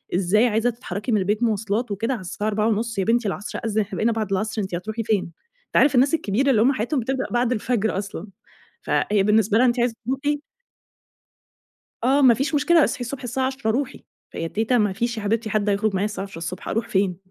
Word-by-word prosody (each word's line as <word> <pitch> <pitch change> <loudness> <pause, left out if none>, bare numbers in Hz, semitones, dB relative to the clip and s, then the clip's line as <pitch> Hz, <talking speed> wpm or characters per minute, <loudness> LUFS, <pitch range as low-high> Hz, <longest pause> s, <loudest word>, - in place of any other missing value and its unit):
إزاي 195 +6 +3
عايزه 225 +1 +1
تتحركي 220 -1 -5
من 215 - +4
البيت 205 +4 0
مواصلات 220 +1 0
وكده 230 +6 -1
على 220 - -5
الساعة 205 +4 -4
16:30 220 +1 0
يا - - +2
بنتي 230 +1 +1
العصر 200 +1 -4
أذن 215 0 +1
إحنا 200 - -5
بقينا 230 +2 +2
بعد 220 -3 -3
العصر 215 +3 -1
أنتِ 190 -3 -3
هتروحي 220 +6 -4
فين؟ 210 -3 +1 0.4
أنت - - -18
عارف 275 -1 +5
الناس 270 +5 +4
الكبيرة 270 -1 +1
اللي 225 -5 +4
هُم 265 +5 +4
حياتهم 255 +5 -1
بتبدأ 265 +3 -2
بعد 240 0 +1
الفجر 220 -3 0
أصلًا، 200 0 -5 0.5
فهي 205 -2 +1
بالنسبة 215 +1 +3
لها 255 - +5
أنتِ 240 0 +1
عايزه 240 -1 +1
تروحي 285 +4 -1 1.6
آه 270 +4 +3
ما 250 -3 +7
فيش 275 +6 -2
مشكلة 300 +2 +4
اصحي 280 - -2
الصبح 255 +2 -5
الساعة 260 +2 -1
10:00 260 -4 -2
روحي 265 +3 -3 0.3
فيا 165 - -4
تيته 225 +6 +1
ما 210 -3 +2
فيش 235 +3 -2
يا 220 - -4
حبيبتي 220 +2 -1
حد 210 0 0
هيخرج 205 +1 +1
معايا 190 +2 +1
الساعة 205 -2 -3
10:00ص 180 -2 -7
أروح 225 +1 -2
فين؟ 190 -4 +1
220 Hz, 210 wpm, -23 LUFS, 205-245 Hz, 1.6 s, ما